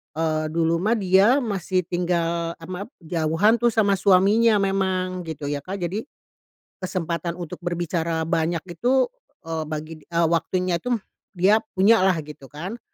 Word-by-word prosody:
eee, 155 -1 0
dulu 165 0 +1
mah 215 +5 +2
dia 195 +8 +4
masih 190 -4 -1
tinggal 170 -1 -1
a 165 - -10
map 185 +3 -5
jauhan 165 +6 +2
tuh 240 -1 +3
sama 200 -3 +3
suaminya 205 +3 +4
memang, 185 -2 -1
gitu 150 -2 -5
ya 145 0 -2
Kak. 195 +1 -5
Jadi, 190 +6 -2 0.8
kesempatan 170 -2 -3
untuk 175 0 -7
berbicara 170 -1 -1
banyak 165 0 0
itu, 255 - +2 0.4
eee, 160 -1 -3
bagi 155 +1 -5 0.2
waktunya 170 +2 +1
itu, 245 +6 -1 0.4
dia 200 +5 +4 0.2
punya 200 +4 +5
lah, 185 -2 +4
gitu 145 -2 -11
kan. 180 - -7
175 Hz, 145 wpm, -23 LUFS, 165-195 Hz, 0.8 s, punya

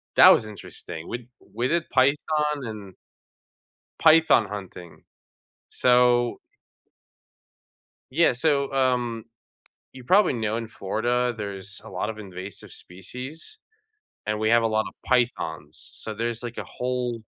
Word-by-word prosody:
that - - +10
was 110 - +4
interesting. 95 -5 -9
We 120 - -2
d 120 - -18 0.3
we 120 +3 0
did 170 +2 0
python 150 +2 +1
and 105 -4 -8 1.0
Python 160 -8 +6
hunting. 95 -4 -9 0.7
So 125 -1 +3 1.7
Yeah, 160 -2 +4
so, 140 +1 +1
um, 125 -4 0 0.7
you 130 -1 -12
probably 185 +1 +4
know 110 -2 -1
in 115 -1 -4
Florida, 120 +4 -1
there's 100 -1 -7
a 110 - -10
lot 105 - -3
of 110 - -11
invasive 95 -1 -9
species, 125 - -8 0.7
and 105 0 -1
we 110 - +1
have 115 0 +5
a 115 - +3
lot 110 0 +1
of - - -11
pythons. 100 - 0 0.2
So, 110 - -6
there's 115 +1 -3
like 120 -1 -6
a - - -3
whole 125 -2 -3
120 Hz, 130 wpm, -25 LUFS, 105-130 Hz, 1.7 s, that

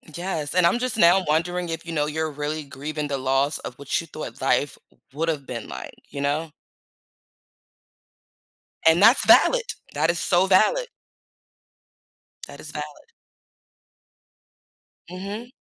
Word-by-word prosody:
Yes, 170 -5 -3
and 180 -1 +4
I'm 175 +8 +3
just 250 -2 -2
now 185 0 +5
wondering 175 +3 0
if, 165 0 -5
you 170 - -6
know, 150 -2 0
you're 160 +1 -2
really 150 +2 -4
grieving 145 +2 -5
the 140 -1 -2
loss 135 +2 +1
of 125 - -8
what 140 -1 -1
you 165 - -7
thought - - -8
life - - +1 0.4
would’ve 155 -1 -2
been 115 -3 -6
like. - - -8
You 140 - -6
know? 150 +3 -1 2.3
And 160 +3 +5
that's 230 +5 +6
valid. - - +6 0.3
That 155 +3 +1
is 170 - -4
so 180 0 +2
valid. 215 - +3 1.6
That - - -12
is - - -9
valid. 470 - -8 2.0
Mhm. 200 +6 -7
165 Hz, 135 wpm, -24 LUFS, 145-185 Hz, 2.3 s, that's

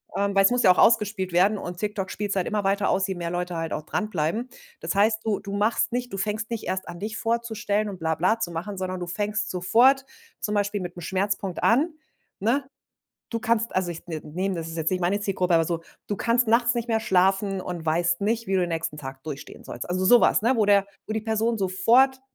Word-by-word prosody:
ähm, 200 0 0
weil 195 0 +5
es - - +4
muss 245 0 +2
ja 185 - +8
auch - - -11
ausgespielt 205 -5 +3
werden, 200 +4 +4
und 175 -2 -6
TikTok 205 -1 -3
spielt's 205 0 -3
halt 180 - 0
immer 210 -1 -1
weiter 200 +1 +1
aus, 190 0 +2
je 190 - -3
mehr 170 -1 -4
Leute 175 0 -3
halt 165 0 -3
auch 150 - -3
dranbleiben. 210 +6 -2 0.3
Das - - -3
heißt, 215 +2 +3
du 210 -2 0
du 200 - -8
machst 210 +3 +1
nicht 245 0 -3
du - - -3
fängst 215 +2 -2
nicht 230 -2 -4
erst 185 0 -3
an, 175 - -8
dich 215 +2 -4
vorzustellen 220 -2 -1
und 190 -3 -8
bla 160 0 0
bla 200 +7 +1
zu 175 -6 -2
machen, 185 +4 -5
sondern 185 0 -3
du - - -2
fängst 210 +3 -2
sofort 245 +9 +4 0.3
zum 210 0 -2
Beispiel 205 0 0
mit 175 0 -6
'nem 175 - -8
Schmerzpunkt 190 +1 -2
an, 295 +8 +3 0.5
ne? 240 +7 +1 0.7
Du 230 -1 -2
kannst 230 -1 0
also, 185 -2 0
ich 165 - -8
ne, 160 -3 -5
nehme 185 +5 -3
das 165 -1 -5
ist 165 - -7
jetzt 160 +1 0
nicht 185 0 -1
meine 195 +4 +1
Zielgruppe, 185 -3 0
aber 165 - +4
so, 165 0 -3 0.2
du 205 - -2
kannst 235 0 +2
nachts 235 +1 +3
nicht 235 0 -2
mehr 225 -1 +1
schlafen 195 0 +2
und 175 -3 -6
weißt 170 +3 +1
nicht, 225 +3 0
wie 195 - -1
du 185 - +3
den 175 - 0
nächsten 165 -2 -3
Tag 135 -1 -8
durchstehen 145 -3 -8
sollst. 120 - -7
Also, 185 +1 0
so 240 +5 +7
was, - - +3
ne, 250 +4 +3
wo 220 - +3
der 200 -1 +4 0.2
wo 215 - -3
die 220 - -1
Person 220 +1 0
sofort 235 +8 +3
200 Hz, 240 wpm, -25 LUFS, 180-220 Hz, 0.7 s, ja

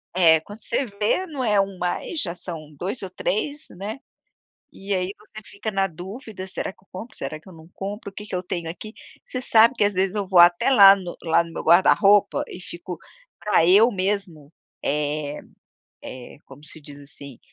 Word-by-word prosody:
É. 165 -3 +6
Quando 205 +6 -12
você 255 +5 -1
vê 210 - -1
não 285 -7 -5
é 210 -3 +2
1 195 -1 -5
mais, 180 - -3
já 170 0 -3
são 155 -4 -8
2 195 - -4
ou 190 - -6
3, 285 +11 -3
né. 205 +7 -7 0.7
E 195 +1 -5
aí 185 +1 -1
você 215 +1 -13
fica 210 +2 -6
na 195 0 +1
dúvida: 190 - -9
"Será 190 - -4
que 190 - -27
eu - - -35
compro, 215 +6 -9
será 155 +3 -5
que 155 - -23
eu - - -13
não 160 0 -15
compro, 200 +2 -6
o - - -33
que 210 - -9
que 190 - -5
eu 180 - -3
tenho 170 -2 -4
aqui?" 215 +6 -9 0.3
Você 255 - -5
sabe 230 0 +5
que, 210 - +1
às 205 - 0
vezes, 190 +2 0
eu 200 -2 -2
vou 185 -2 +4
até 175 +8 +6
lá 200 -6 +9
no 180 -3 -7
lá 165 0 +3
no 165 - -11
meu - - -5
guarda 175 +3 +6
roupa 205 0 +3
e 180 - -9
fico 175 0 -8 0.4
pra 210 -6 +2
eu 210 +6 +6
mesmo, 185 -6 -3 0.3
eh 150 0 -2 0.6
eh, 130 +2 -10
como 135 +2 -15
se 155 - -12
diz, 145 0 -12
assim, 140 -2 -12
190 Hz, 210 wpm, -23 LUFS, 170-210 Hz, 0.7 s, lá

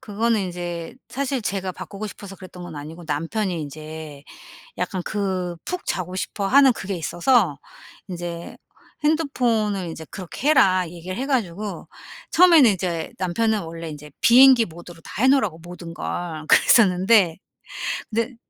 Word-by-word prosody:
그거는 220 +1 0
인제 175 0 -5
사실 270 -2 -2
제가 190 -2 -2
바꾸고 205 +3 -7
싶어서 195 0 -10
그랬던 185 -1 -11
건 170 -3 -8
아니고 160 +4 -9
남편이 165 +4 -2
인제 155 0 -9 0.5
약간 185 -2 -2
그 185 -4 -2
푹 360 0 -5
자고 185 0 -3
싶어 200 +1 -3
하는 270 +4 +6
그게 195 -1 -4
있어서 175 - +2 0.5
인제 175 -2 -6 0.5
핸드폰을 235 - +1
이제 160 0 -8
그렇게 195 - -4
해라 185 - +4
얘기를 175 +2 -7
해 265 - -3
가지고 210 -7 -2 0.4
처음에는 335 -8 +7
인제 175 -3 -3
남편은 215 +4 0
원래 165 0 -7
인제 150 0 -10
비행기 250 -1 +7
모드로 170 0 -12
다 210 - -5
해 260 - +5
놓으라고 240 - +2
모든 175 0 -9
걸. 160 -3 -5
그랬었는데 190 -5 +5 0.7
근데 230 +3 -2
185 Hz, 315 characters per minute, -23 LUFS, 170-225 Hz, 0.7 s, 처음에는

